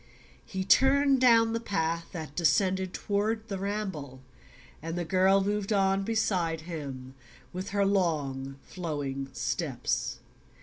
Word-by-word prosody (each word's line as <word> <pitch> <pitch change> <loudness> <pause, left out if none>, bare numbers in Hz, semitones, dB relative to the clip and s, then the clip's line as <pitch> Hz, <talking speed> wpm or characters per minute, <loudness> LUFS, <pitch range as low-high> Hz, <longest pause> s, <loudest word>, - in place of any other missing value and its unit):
He 190 -1 -4
turned 270 +3 +4
down 230 -2 +5
the 230 - 0
path 165 -6 -1
that 155 -5 -7
descended 185 +2 +2
toward 215 +3 -1
the 195 -2 -3
Ramble 190 -10 -4 0.6
and 165 +2 -4
the 175 - -2
girl 190 +3 +4
moved 205 +1 -1
on 195 -1 +3
beside 190 -7 0
him 140 -6 -7 0.4
with 185 +2 -4
her 200 0 +1
long 145 -9 0
flowing 145 -6 -4
steps. - - -2
190 Hz, 125 wpm, -29 LUFS, 160-205 Hz, 0.6 s, down